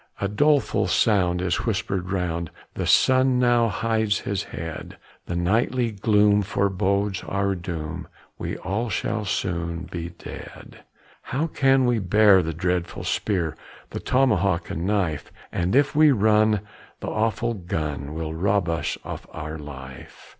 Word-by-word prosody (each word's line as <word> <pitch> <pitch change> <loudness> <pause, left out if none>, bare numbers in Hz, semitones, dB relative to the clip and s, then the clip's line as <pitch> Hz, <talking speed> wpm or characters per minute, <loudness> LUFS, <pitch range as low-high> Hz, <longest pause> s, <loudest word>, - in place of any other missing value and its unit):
A 100 - 0
doleful 145 +6 +2
sound 90 -4 +2
is 90 0 +1
whispered 95 -4 -1
round, 85 -3 -2 0.2
The - - -3
sun 130 0 +4
now 120 -2 +4
hides 110 0 0
his 100 -1 -2
head; 80 -1 -7 0.3
The 85 - -3
nightly 115 +7 +1
gloom 105 0 +3
forebodes 100 0 0
our 100 0 0
doom, 85 -1 -5 0.3
We - - -4
all 110 +5 -2
shall 105 +2 -2
soon 85 -2 -2
be 85 -2 -6
dead. 85 - -11 0.4
How 145 +5 -2
can 135 -4 +3
we 120 -2 +2
bear 100 0 +5
the 80 -1 -3
dreadful 90 +1 -2
spear, 85 -7 -1 0.4
The - - -4
tomahawk 100 -10 +1
and 85 +3 -3
knife? 95 -8 -1 0.2
And 90 +5 0
if 145 +2 +3
we 155 0 +6
run, 110 -2 +3 0.4
the - - -6
awful 115 +2 0
gun 75 -6 -4
Will 80 -1 -3
rob 95 +1 +1
us 80 0 -1
of - - -7
our 80 0 -6
life. 65 -3 -11
100 Hz, 140 wpm, -24 LUFS, 85-110 Hz, 0.4 s, we